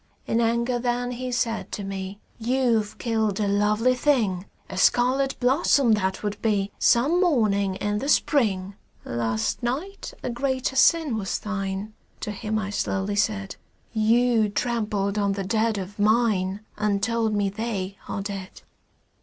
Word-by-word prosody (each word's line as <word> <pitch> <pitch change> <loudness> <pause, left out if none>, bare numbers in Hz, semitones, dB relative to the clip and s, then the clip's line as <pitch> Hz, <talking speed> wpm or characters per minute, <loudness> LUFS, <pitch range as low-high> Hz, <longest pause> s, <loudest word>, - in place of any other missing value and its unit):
In 230 - +1
anger 235 +2 +1
then 245 0 -1
he 250 +1 -4
said 230 -2 -1
to 205 - -3
me: 195 0 -5 0.2
"You've 235 -3 +1
killed 220 -4 0
a 210 - +1
lovely 210 +5 +2
thing; 225 -9 +1 0.2
A - - -7
scarlet 255 +7 +2
blossom 260 0 +3
that 190 -2 0
would 205 -1 -3
be 205 -3 +1
Some 295 +10 +4
morning 210 - +2
in 205 +2 -1
the 275 - -3
Spring." 200 -12 +2 0.3
"Last 115 -2 -1
night 300 +12 -4
a - - -2
greater 260 +1 -1
sin 305 -4 +4
was 195 -2 -2
thine," 195 0 -4 0.3
To 210 - -3
him 215 +1 -3
I 205 -2 -3
slowly 200 0 -1
said; 200 -1 -1 0.4
"You 225 0 +3
trampled 210 -3 -1
on 200 -1 +1
the 195 0 -3
dead 220 +2 +1
of 195 +2 -6
mine 210 -3 +2 0.2
And 205 -1 0
told 230 -2 +1
me 205 -1 +1
they 200 -2 -3
are 195 - -3
dead." 195 -2 -7
215 Hz, 150 wpm, -25 LUFS, 200-240 Hz, 0.4 s, Some